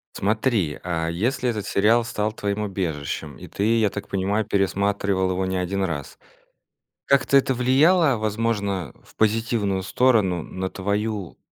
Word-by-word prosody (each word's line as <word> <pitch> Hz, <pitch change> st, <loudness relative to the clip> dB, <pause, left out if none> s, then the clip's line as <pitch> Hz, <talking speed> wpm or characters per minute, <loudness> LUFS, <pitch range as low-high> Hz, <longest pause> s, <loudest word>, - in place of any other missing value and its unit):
Смотри, 105 Hz, -, 0 dB
а 85 Hz, -2 st, -2 dB
если 125 Hz, +9 st, 0 dB
этот 105 Hz, -3 st, -3 dB
сериал 110 Hz, +4 st, +3 dB
стал 105 Hz, -2 st, -2 dB
твоим 105 Hz, -1 st, -2 dB
убежищем 80 Hz, -7 st, -4 dB
и -, -, -10 dB
ты, 110 Hz, +3 st, +1 dB
я 105 Hz, -2 st, +3 dB
так 100 Hz, -, -7 dB
понимаю, 100 Hz, +3 st, 0 dB
пересматривал 100 Hz, -1 st, 0 dB
его 95 Hz, +1 st, -1 dB
не 95 Hz, 0 st, -2 dB
1 95 Hz, +2 st, -1 dB
раз, 75 Hz, -6 st, -5 dB, 0.9 s
как-то 140 Hz, 0 st, +4 dB
это 135 Hz, 0 st, +1 dB
влияло 140 Hz, +4 st, +4 dB
возможно 105 Hz, -, -1 dB
в -, -, -22 dB
позитивную 110 Hz, -3 st, +1 dB
сторону 100 Hz, -5 st, +2 dB
на 95 Hz, 0 st, -4 dB
твою 100 Hz, 0 st, -3 dB
100 Hz, 140 wpm, -23 LUFS, 95-115 Hz, 0.9 s, как-то